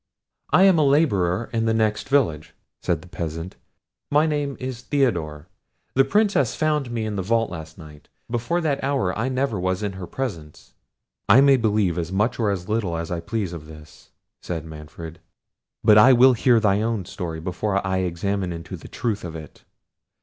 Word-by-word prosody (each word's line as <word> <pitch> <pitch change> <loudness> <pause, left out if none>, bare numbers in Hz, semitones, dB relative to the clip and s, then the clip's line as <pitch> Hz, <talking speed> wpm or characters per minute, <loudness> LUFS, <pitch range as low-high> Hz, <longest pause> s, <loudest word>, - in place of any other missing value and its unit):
"I 185 - +5
am 190 -4 +5
a - - +4
labourer 115 - +2
at 115 -1 0
the 115 - +2
next 110 +2 0
village," 110 - 0 0.3
said - - -1
the - - -14
peasant; 80 +2 -5 0.5
"my 150 +2 +3
name 145 -3 -2
is 130 -2 -5
Theodore. 115 - -1 0.5
The 135 - +5
Princess 195 - +2
found 150 -4 0
me 115 -2 -3
in 105 -2 -3
the - - -1
vault 115 +4 0
last 80 -2 -8
night: 75 -3 -14 0.2
before 120 +9 -1
that 145 -5 -1
hour 135 -10 0
I 110 +5 -1
never 130 -5 -1
was 95 +2 -1
in 100 - -1
her 95 -2 -8
presence." 85 -14 -6 0.6
"I 130 - +8
may 140 0 +6
believe 105 -7 +1
as 85 +1 -4
much 105 +6 0
or 110 -3 +1
as 90 -3 -3
little 105 -6 -1
as 85 0 -5
I 85 - -2
please 100 0 -3
of 75 -3 -8
this," 75 -1 -14 0.3
said 80 -3 -5
Manfred; 80 +1 -10 0.6
"but 105 -1 +7
I 130 +5 +8
will 130 +1 +6
hear 120 0 +3
thy 105 -2 +2
own 110 -4 -1
story 85 -4 -5
before 95 +4 -2
I 95 0 0
examine 95 +1 -2
into 85 -1 -7
the - - -12
truth 110 -4 -3
of 85 -2 -6
it. 75 -2 -11
105 Hz, 185 wpm, -23 LUFS, 85-130 Hz, 0.6 s, I